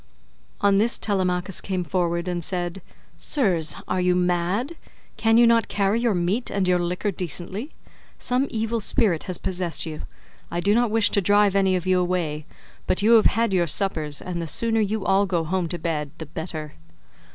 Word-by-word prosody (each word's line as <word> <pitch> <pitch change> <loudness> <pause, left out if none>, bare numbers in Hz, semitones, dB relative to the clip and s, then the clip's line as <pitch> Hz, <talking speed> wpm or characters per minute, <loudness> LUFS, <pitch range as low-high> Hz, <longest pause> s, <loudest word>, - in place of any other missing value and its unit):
On 200 -1 +4
this 225 +4 +2
Telemachus 185 -2 -1
came 185 -2 -2
forward 170 +1 -1
and 175 -1 -2
said, 175 +1 -3 0.4
"Sirs, 180 - +2
are 185 - 0
you 180 0 +2
mad? 180 - 0 0.4
Can 225 0 +3
you 240 - +7
not 230 -1 +3
carry 205 +3 0
your 235 -4 +1
meat 180 +8 -1
and 195 -2 -1
your 180 -1 +3
liquor 180 +4 -2
decently? 185 - -4 0.5
Some 255 +3 0
evil 225 +1 -2
spirit 200 -5 +1
has 185 -3 -4
possessed 175 -5 -2
you. 155 -2 -6 0.5
I 170 - -3
do 200 +4 +2
not 240 +1 +2
wish 220 0 +2
to 200 - +2
drive 205 +1 +3
any 190 -1 +3
of 180 -1 -3
you 185 -1 +2
away, 170 -4 -2 0.4
but 185 - +1
you 220 - +4
have 225 -2 +7
had 230 -3 0
your 175 -2 +2
suppers, 155 -5 0
and 175 -2 -4
the 165 - -4
sooner 225 +8 +2
you 210 -1 -2
all 195 +1 +3
go 175 -3 0
home 180 +2 -1
to 175 - -4
bed 155 -3 -3
the 160 - -7
better." 155 -1 -6
185 Hz, 185 wpm, -23 LUFS, 175-210 Hz, 0.5 s, you